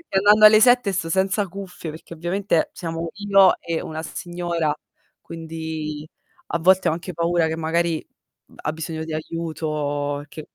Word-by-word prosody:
Andando 210 +2 +6
alle 215 0 +9
7 245 -3 +5
sto 165 -3 -2
senza 190 +2 +1
cuffie, 185 -3 -8
perché 160 +2 -11
ovviamente, 175 +1 0
siamo 165 -1 -4
io 195 -2 +5
e 165 -1 -3
una 160 0 -5
signora, 175 -4 -2 0.5
quindi 160 -2 -6 0.4
a 170 - -1
volte 185 +2 +4
ho - - +1
anche 175 +2 -6
paura 170 0 +1
che 160 0 -3
magari, 165 0 0 0.4
mh, - - -23
ha 150 - -3
bisogno 160 0 -5
di 160 -1 -6
aiuto, 150 -3 -3
che 155 - -8
165 Hz, 155 wpm, -22 LUFS, 160-185 Hz, 0.5 s, alle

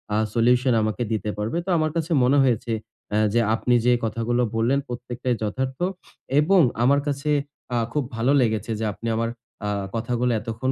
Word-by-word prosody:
আ - - +2 0.2
solution 125 +2 +3
আমাকে 110 +1 -1
দিতে 110 -1 -1
পারবে। 110 +9 -2
তো - - -5
আমার 155 -1 +1
কাছে 165 0 -2
মনে 135 +3 +4
হয়েছে 120 -2 0 0.4
এ - - +3 0.2
যে 120 - +4
আপনি 125 +2 +1
যে 125 - +5
কথাগুলো 115 +2 0
বললেন, 120 +5 +2
প্রত্যেকটাই 120 0 -3
যথার্থ 130 +5 -2 0.6
এবং 180 +4 +5 0.2
আমার 140 +3 +4
কাছে 140 +1 -2 0.5
আ - - +2 0.2
খুব 150 - +1
ভালো 115 +4 +1
লেগেছে 110 -1 0
যে, 110 - -1
আপনি 115 - -7
আমার 115 +1 0 0.4
আ - - 0 0.3
কথাগুলো 120 +2 0
এতক্ষণ 115 +4 -2
120 Hz, 175 wpm, -24 LUFS, 115-130 Hz, 0.6 s, যে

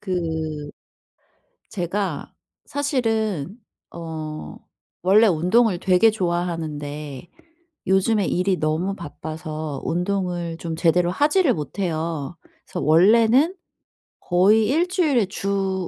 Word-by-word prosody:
그 160 -6 -3 1.0
제가 185 -3 -3 0.3
사실은 225 - -1 0.3
어 160 -2 -7 0.5
원래 200 +5 +5
운동을 185 +3 +2
되게 190 +4 +4
좋아하는데 160 -6 -3 0.6
요즘에 195 +2 +2
일이 185 +1 +1
너무 160 +6 -1
바빠서 155 -1 -6
운동을 175 -2 -2
좀 165 -1 -5
제대로 175 +2 +2
하지를 295 - +3
못해요. 165 -1 -3 0.3
그래서 - - -6
원래는 230 - +5 0.7
거의 205 +5 +3
1 325 +6 +2
주일에 310 - +2
주 195 -1 -2
180 Hz, 205 characters per minute, -22 LUFS, 160-210 Hz, 1.0 s, 원래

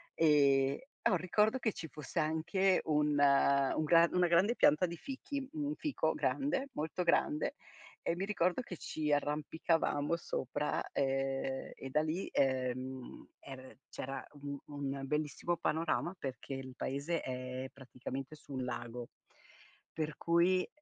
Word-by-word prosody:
Ehm, 140 -3 +4 0.3
ho - - +1
un 185 - +4
ricordo 210 +8 +2
che 220 -4 0
ci 160 - -6
fosse 150 +1 -9
anche 165 +5 +2
un 150 -1 +2
un 140 0 +4
gra 165 +2 +6
una 180 -1 +4
grande 190 +8 +4
pianta 155 +5 +5
di 170 - -6
fichi, 275 - -5
un 295 -1 -2
fico 300 -2 0
grande, 275 -1 0
molto 160 +4 -2
grande, 300 - +2 0.5
e 170 - 0
mi 190 - -2
ricordo 185 0 +1
che 180 -8 -8
ci 150 -1 -2
arrampicavamo 150 +1 +1
sopra, 150 -2 -2
ehm, 135 -1 -1
e 135 - -7
da 150 +3 +2
lì, 160 +5 -2
ehm, 130 -1 -1
er 130 -2 -11
c'era 135 +1 -5 0.2
un 140 0 -4
un 140 -1 -4
bellissimo 150 +4 -1
panorama 165 +3 0
perché 135 0 -5
il 130 -1 -7
paese 145 +5 -2
è 130 0 -4
praticamente 135 +2 -7
sul 135 -3 -6
lago, 120 -1 -5 0.8
per 155 -1 -3
cui 175 +2 +3
150 Hz, 140 wpm, -34 LUFS, 135-175 Hz, 0.8 s, gra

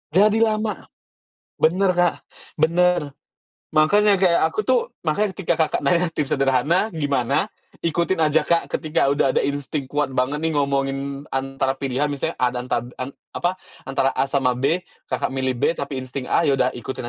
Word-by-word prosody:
Jadi 210 +3 +5
lama! 215 -1 0 0.7
Benar, 185 +4 +3
Kak, 175 -1 +2 0.4
benar. 170 -1 +2 0.6
Makanya 200 +6 +4
kayak 180 -3 +3
aku - - -2
tuh - - +4 0.3
makanya 200 +6 +1
ketika 175 -3 0
Kakak - - -2
nanya 175 +5 +2
tips 145 -3 0
sederhana, 140 - +2
gimana? 140 -6 0 0.4
Ikutin 170 +2 0
aja, 155 0 +3
Kak, 170 0 +2
ketika 155 -3 0
udah 140 -1 +2
ada - - +3
insting 140 0 -3
kuat 145 -2 0
banget 130 +3 0
nih, 160 -1 0
ngomongin 140 0 -1
antara 135 0 -1
pilihan, 135 +2 -1
misalnya 140 -1 -3
A 125 - +3
dan 125 0 -4
tab 120 +1 -1
en 130 - -5 0.2
apa, 175 +1 0 0.3
antara 135 0 +1
A - - +1
sama 135 -3 +2
B, 140 +7 +2 0.3
Kakak - - -1
milih 130 -1 0
B - - +2
tapi 140 -2 -4
insting 130 0 -6
A, - - +3
ya 140 - +3
udah 125 - +3
ikutin 120 0 -6
145 Hz, 170 wpm, -22 LUFS, 135-175 Hz, 0.7 s, Jadi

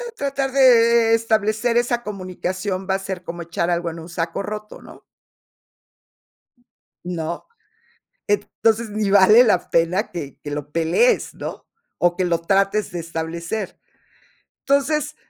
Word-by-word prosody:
tratar 275 - -2
de, 235 -3 +5
eh, - - +6
establecer 220 +1 0
esa 240 0 +1
comunicación 185 -1 -4
va 190 - +2
a 195 - -2
ser 190 -2 -6
como 170 0 -6
echar 170 +1 -2
algo 170 0 0
en 165 0 -8
un 160 - -10
saco 170 +1 -3
roto, 210 +1 -7
¿no? - - -14 2.0
¿no? 170 -1 -4 0.8
Entonces, 220 +2 0
ni 210 -1 -1
vale 205 +5 +7
la 195 -6 +1
pena 170 +6 +1
que 145 -6 -7
que 145 - -6
lo 145 0 -5
pelees, 165 - +2
¿no? - - -7 0.3
O 175 0 +2
que 185 - 0
lo 170 -2 0
trates 195 +3 +1
de 175 - -4
establecer. 165 +5 -5 0.9
Entonces, 300 +2 +1
195 Hz, 135 wpm, -21 LUFS, 170-230 Hz, 2.0 s, vale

